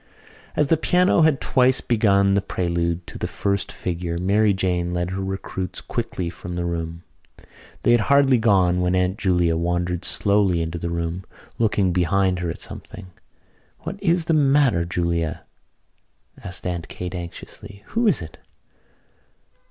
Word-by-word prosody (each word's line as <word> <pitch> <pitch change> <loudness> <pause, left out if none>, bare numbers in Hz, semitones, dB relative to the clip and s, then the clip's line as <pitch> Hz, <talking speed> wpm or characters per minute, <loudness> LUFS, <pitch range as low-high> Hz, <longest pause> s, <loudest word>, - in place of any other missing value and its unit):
As 150 - +3
the 160 +3 +2
piano 180 +2 +3
had 155 -4 +4
twice 130 0 +3
begun 100 -4 +3
the 100 - +2
prelude 85 -2 -2
to - - -10
the - - -2
first 100 -1 -2
figure 85 -1 -4
Mary 100 +4 +3
Jane 90 -2 -1
led 90 +1 -2
her 95 +1 -3
recruits 95 -1 -4
quickly 90 - -4
from 90 +1 -7
the 85 0 -2
room. 85 0 -4 0.8
They - - +4
had 120 - +5
hardly 140 -3 +5
gone 95 -5 +3
when 90 +1 +1
Aunt 90 +2 0
Julia 90 -3 +2
wandered 90 +1 -1
slowly 100 -4 +1
into 80 +1 -3
the 85 - -3
room, 85 +2 -3 0.4
looking 100 -5 +2
behind 95 +1 +1
her 90 -1 -2
at - - -6
something. 95 -3 -10 0.7
"What 195 +5 -6
is 175 -3 +2
the 165 - +1
matter, 140 - +3
Julia?" 85 -2 -2 1.0
asked 90 - -6
Aunt 85 -2 -3
Kate 90 0 -6
anxiously. 90 +3 -9
"Who 230 +1 +1
is 155 - +2
it?" 80 - -12
90 Hz, 150 wpm, -22 LUFS, 85-105 Hz, 1.0 s, had